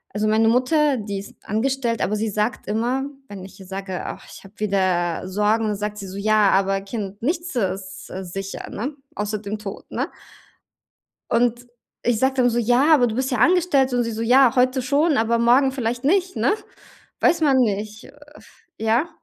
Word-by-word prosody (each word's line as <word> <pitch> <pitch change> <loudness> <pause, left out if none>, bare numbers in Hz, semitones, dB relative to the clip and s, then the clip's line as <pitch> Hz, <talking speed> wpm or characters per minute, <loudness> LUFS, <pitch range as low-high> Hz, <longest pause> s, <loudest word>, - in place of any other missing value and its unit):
also 215 +1 0
meine 220 +1 +3
Mutter, 265 +4 +3
die 205 -2 -4
ist 200 - -10
angestellt, 235 +1 -1
aber 210 - 0
sie 215 +1 -1
sagt 210 +4 -2
immer, 240 +6 0 0.2
wenn 200 -5 -9
ich 190 - -13
ihr 190 - -11
sage: 190 0 -5
„Ach, - - -7
ich - - -12
habe 195 +1 -15
wieder 185 -4 0
Sorgen“, 210 +2 +1
sagt 210 +1 -4
sie 200 -2 -7
so: 190 +1 -8
„Ja, 210 -1 +3
aber 195 0 +2
Kind, 200 -1 -6
nichts 335 +2 -2
ist, 190 -3 -3
äh, 190 - -5
sicher“, 195 +2 -6
ne, 270 +8 -4 0.2
außer 210 +1 -2
dem 205 +1 -5
Tod, 205 -2 -8
ne? - - -2 1.2
Und 240 +1 +1 0.4
ich 235 -2 +1
sage 265 0 +2
dann 245 -2 +3
so: 240 - 0
„Ja, 245 +7 +4
aber 250 -5 +5
du 220 - -3
bist 260 +2 -1
ja 250 - 0
angestellt“, 280 -3 +3
und 245 0 +2
sie 230 - -3
so: 220 0 -4
„Ja, 250 +1 +5
heute 255 +1 +2
schon, 285 +4 +2
aber 230 +1 +2
morgen 250 +3 +4
vielleicht 245 -1 -3
nicht“, 370 +5 +1
ne? - - +2 0.7
Weiß 335 - +3
man 280 -4 +4
nicht, 215 -2 -1
äh - - -15 0.6
ja? 230 +9 +1
225 Hz, 190 wpm, -22 LUFS, 200-260 Hz, 1.2 s, aber